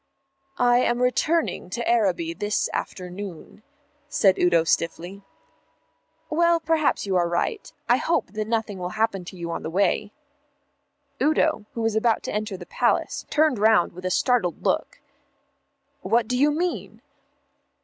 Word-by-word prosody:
"I 245 0 +4
am 240 -1 +1
returning 250 - 0
to 235 +5 -4
Araby 185 -8 +1
this 205 +5 -1
afternoon," 185 +1 -6 0.5
said 190 -2 +3
Udo 170 -2 +4
stiffly. 170 +4 -2 1.1
"Well, 340 +1 +3
perhaps 315 -5 +1
you're 180 -3 +1
right. 175 - -2 0.2
I - - +4
hope 330 - -1
that 215 0 -3
nothing 220 -4 -2
will 180 +2 -5
happen 215 -4 0
to 185 - -10
you 170 -1 -5
on - - -4
the - - -5
way." 200 +3 +1 1.1
Udo, 305 -8 +2
who 230 - -3
was 225 -1 0
about 225 0 +2
to - - -4
enter 210 -2 -3
the 175 - -10
Palace, - - -1
turned 305 -6 +2
round 215 -3 +4
with 180 +1 -11
a - - +1
startled 185 -3 +1
look. - - -1 1.0
"What 225 +3 +1
do 250 - -1
you 285 +4 +4
mean?" 345 +4 -3
215 Hz, 145 wpm, -24 LUFS, 180-250 Hz, 1.1 s, I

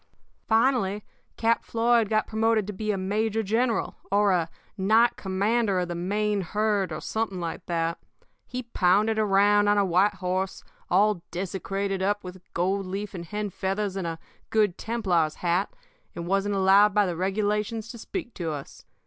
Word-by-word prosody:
"Finally, 220 -3 +2 0.3
Cap 230 0 +2
Floyd 230 -1 +2
got 215 0 +2
promoted 220 -1 +1
to 210 - -5
be 215 +2 -4
a 205 - +1
major 215 +3 0
general, 225 +3 0
or 205 0 +4
a 170 -3 +1 0.3
knight 220 +4 +3
commander 200 +2 0
of 180 -1 -1
the - - -2
main 205 +4 0
herd, 205 +1 0
or - - -4
something 220 -4 -3
like 170 -1 -4
that. 165 0 -1 0.5
He 255 0 -4
pounded 215 0 +2
around 205 0 +4
on 205 0 +4
a 200 - +3
white 190 +3 +3
horse, 185 0 -2 0.3
all 200 0 +3
desecrated 195 +2 -3
up 205 +2 0
with 180 0 -9
gold 190 +2 0
leaf 200 +3 -4
and 175 -2 -6
hen 210 +3 -4
feathers 195 +2 -2
and 190 -3 -2
a 165 -1 -4 0.3
Good 210 -5 +2
Templar's 185 -9 0
hat, 175 +2 0 0.4
and 170 - -5
wasn't 195 +2 0
allowed 195 +2 +5
by 210 -1 +4
the 175 -2 -2
regulations 210 +4 -1
to 235 - -10
speak 285 - -6
to 170 -3 -4
us. 145 -2 -8
200 Hz, 165 wpm, -26 LUFS, 185-215 Hz, 0.5 s, allowed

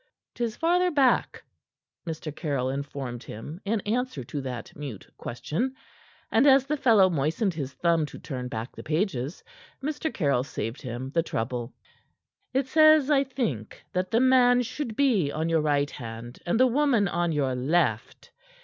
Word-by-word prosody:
"'Tis 235 -2 -2
farther 355 +2 +3
back," 275 -6 +2 0.6
Mr. 155 -2 -5
Caryll 135 -6 -1
informed 135 -3 -5
him 150 - -8
in 215 +2 +1
answer 230 - -2
to 140 +4 -5
that 125 -3 -6
mute 140 -9 -7
question; 205 - -3 0.6
and 230 +6 +4
as 270 -1 +6
the 300 +2 0
fellow 225 -9 +5
moistened 165 - 0
his 140 -4 -5
thumb 170 0 +2
to - - -10
turn 125 -4 -5
back 115 0 -6
the - - -8
pages, 155 - -2 0.4
Mr. 300 +2 -2
Caryll 140 -8 +1
saved 115 -2 -5
him 130 0 -5
the 165 - +2
trouble. 120 -5 -3 0.8
"It 265 +1 +1
says, 310 0 +5
I 275 -2 +5
think, 235 - -4
that 185 0 -1
the 230 - +3
man 250 -1 +5
should 245 -1 -5
be 220 - +2
on 160 +2 -2
your 165 -1 +3
right 145 -2 +1
hand 115 +1 -8
and 200 +7 +1
the 255 - +7
woman 255 -5 +3
on 175 -1 0
your 140 -4 0
left. 130 -3 0
165 Hz, 160 wpm, -27 LUFS, -, 0.8 s, the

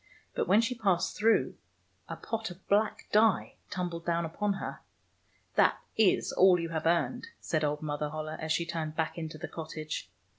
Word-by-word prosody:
But - - -1
when 200 +5 +6
she 240 +2 0
passed 195 -7 +1
through, 225 +2 +2 0.5
a - - -3
pot 225 -1 -4
of 180 +1 -13
black 210 +1 +2
dye 215 0 +3
tumbled 175 -3 -3
down 170 0 0
upon 200 +5 -1
her. - - -5 0.4
" - - -39
That - - +5 0.2
is 220 -4 +3
all 185 -1 +6
you 165 0 -3
have 160 -1 -1
earned," 170 - +1
said 155 -1 -1
old 150 +1 -1
Mother 150 0 -2
Holle, 155 +1 -4
as 155 0 -4
she 170 +2 +1
turned 160 -2 -3
back 160 -1 -1
into 160 -1 -5
the 175 +3 -5
cottage. 155 -1 -6
170 Hz, 185 wpm, -30 LUFS, 155-200 Hz, 0.5 s, when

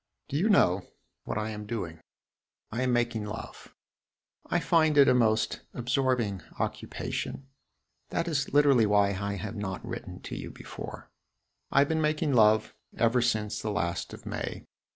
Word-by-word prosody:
Do - - -4
you 185 +9 +2
know 90 - +4 0.4
what - - -3
I 110 +1 -2
am 105 -1 -7
doing? 90 -8 -4 0.7
I 115 +3 -2
am 130 -1 +2
making 120 -2 +1
love. 105 +2 -8 0.7
I 175 - +1
find 160 -1 +3
it 140 -1 +8
a - - +6
most 110 -3 +2
absorbing 125 - 0 0.2
occupation. 135 - -3 0.6
That 170 - -1
is 145 -4 -1
literally 140 -6 +5
why 105 -1 +4
I 100 +1 -2
have 105 +3 -5
not 95 -3 -4
written - - -6
to - - -6
you - - -6
before. - - -9 0.6
I 140 - +5
have 140 - +2
been 160 0 +1
making 150 -1 +1
love 110 -2 +4 0.2
ever 120 +2 +3
since 110 -3 0
the 110 - -2
last 85 -5 -2
of - - -11
May. - - -4
115 Hz, 160 wpm, -29 LUFS, 105-140 Hz, 0.7 s, it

